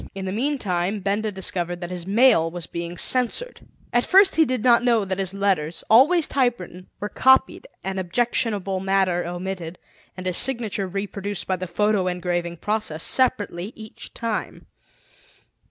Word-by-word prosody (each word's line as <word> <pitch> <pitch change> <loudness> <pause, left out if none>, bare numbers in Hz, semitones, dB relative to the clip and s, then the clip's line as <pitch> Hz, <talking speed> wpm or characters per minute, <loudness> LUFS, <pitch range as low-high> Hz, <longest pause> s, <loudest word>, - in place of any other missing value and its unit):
In 195 -1 -5
the 185 - -3
meantime 210 -6 -1
Benda 205 +3 -1
discovered 175 -2 -2
that 175 0 -5
his 180 -1 -6
mail 215 -5 +4
was 170 0 -5
being 170 +1 -6
censored. 255 - 0 0.3
At 240 0 +3
first 390 +1 +5
he 320 - +5
did 255 -5 -2
not 240 -1 +5
know 230 -4 +2
that 190 0 -3
his 190 -1 +1
letters, 195 -5 -1
always 300 +9 +6
typewritten, 235 - -2
were 205 - -3
copied 265 - +3 0.2
and 190 0 -3
objectionable 195 0 -1
matter 190 -2 +1
omitted, 175 -1 -5 0.4
and 185 - -7
his 185 -1 0
signature 225 -6 -1
reproduced 200 +1 -4
by 185 - -1
the 185 +1 -5
photo 200 +2 +1
engraving 175 -1 -2
process, 210 -6 -1
separately 210 -6 0
each 220 -1 -10
time. 230 -2 -4
195 Hz, 155 wpm, -23 LUFS, 180-235 Hz, 0.4 s, always